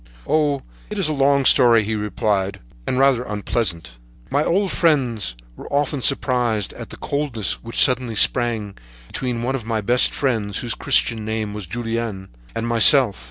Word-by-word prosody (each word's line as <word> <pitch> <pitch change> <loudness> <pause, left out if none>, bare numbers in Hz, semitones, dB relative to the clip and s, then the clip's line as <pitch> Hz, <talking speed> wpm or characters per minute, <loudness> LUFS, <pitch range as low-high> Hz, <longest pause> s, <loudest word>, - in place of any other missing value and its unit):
"Oh, 145 -3 0 0.3
it 210 - -6
is 190 -5 +1
a 155 - -1
long 140 -1 +2
story," 120 -3 +5
he 110 +2 -3
replied; 105 -2 -2 0.3
"a - - 0
rather 135 0 +3
sad 125 - -6
and - - -5
unpleasant 105 -4 -2
story. - - -14 0.3
"My 145 - +2
old 190 +4 0
friends 125 - 0 0.2
were - - -11
often 145 -1 -1
surprised 120 -7 0
at - - -9
the - - -10
coldness 140 -7 -2
which 115 0 -4
suddenly 125 -3 +1
sprang 115 -2 +1
up 100 - -18 0.3
between 120 - -4
one 130 +2 -1
of 135 -4 -4
my 110 0 -2
best 120 +4 +2
friends 110 -7 -2
whose 120 -2 -1
Christian 115 -2 +1
name 110 -1 -3
was 105 -4 -7
Julien, 115 -2 -4 0.3
and 115 0 -3
myself. 115 - +5
115 Hz, 180 wpm, -20 LUFS, 105-135 Hz, 0.3 s, story